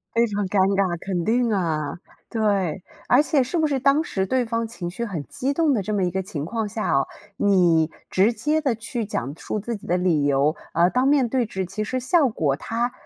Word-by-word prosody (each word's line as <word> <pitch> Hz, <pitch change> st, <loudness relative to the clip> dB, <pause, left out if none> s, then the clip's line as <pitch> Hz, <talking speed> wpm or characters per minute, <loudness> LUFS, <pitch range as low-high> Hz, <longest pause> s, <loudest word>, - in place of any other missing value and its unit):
非 235 Hz, +1 st, +4 dB
常 205 Hz, -2 st, -2 dB
尴 200 Hz, -, 0 dB, 0.2 s
尬， 185 Hz, -3 st, +1 dB
肯 180 Hz, -1 st, -3 dB
定 235 Hz, +1 st, +2 dB
啊， 160 Hz, -6 st, -1 dB, 0.3 s
对， 200 Hz, -6 st, 0 dB, 0.3 s
而 255 Hz, +4 st, +6 dB
且 295 Hz, -3 st, +2 dB
是 265 Hz, +8 st, -4 dB
不 315 Hz, -, +3 dB
是 275 Hz, -2 st, 0 dB
当 275 Hz, +4 st, +3 dB
时 190 Hz, -, -2 dB
对 255 Hz, +4 st, +1 dB
方 230 Hz, 0 st, -2 dB
情 180 Hz, -6 st, -6 dB
绪 235 Hz, +6 st, -4 dB
很 175 Hz, -10 st, -4 dB
激 270 Hz, +2 st, -2 dB
动 320 Hz, -1 st, +2 dB
的 220 Hz, -6 st, +1 dB
这 210 Hz, +3 st, -3 dB
么 200 Hz, -, +1 dB
一 180 Hz, -, +1 dB
个 190 Hz, -, -2 dB
情 175 Hz, -7 st, -5 dB
况 220 Hz, +5 st, -2 dB
下 215 Hz, +2 st, -2 dB
哦， 135 Hz, 0 st, +2 dB, 0.3 s
你 175 Hz, -6 st, +3 dB, 0.2 s
直 200 Hz, +5 st, +3 dB
接 300 Hz, +6 st, 0 dB
地 270 Hz, -6 st, +1 dB
去 230 Hz, +1 st, -4 dB
讲 135 Hz, -, -3 dB
述 215 Hz, -, -3 dB
自 230 Hz, +2 st, -4 dB
己 200 Hz, -, -13 dB
的 175 Hz, -, +1 dB
理 175 Hz, -5 st, +2 dB
由， 145 Hz, +2 st, +2 dB, 0.2 s
而 170 Hz, +2 st, +3 dB
当 255 Hz, +4 st, +1 dB
面 275 Hz, -4 st, +3 dB
对 250 Hz, -1 st, 0 dB
质 190 Hz, -3 st, -3 dB
其 200 Hz, +4 st, -4 dB
实 255 Hz, +5 st, -2 dB
效 275 Hz, +3 st, +3 dB
果 150 Hz, -, 0 dB
她 235 Hz, -, -2 dB
210 Hz, 245 characters per minute, -23 LUFS, 180-245 Hz, 0.3 s, 而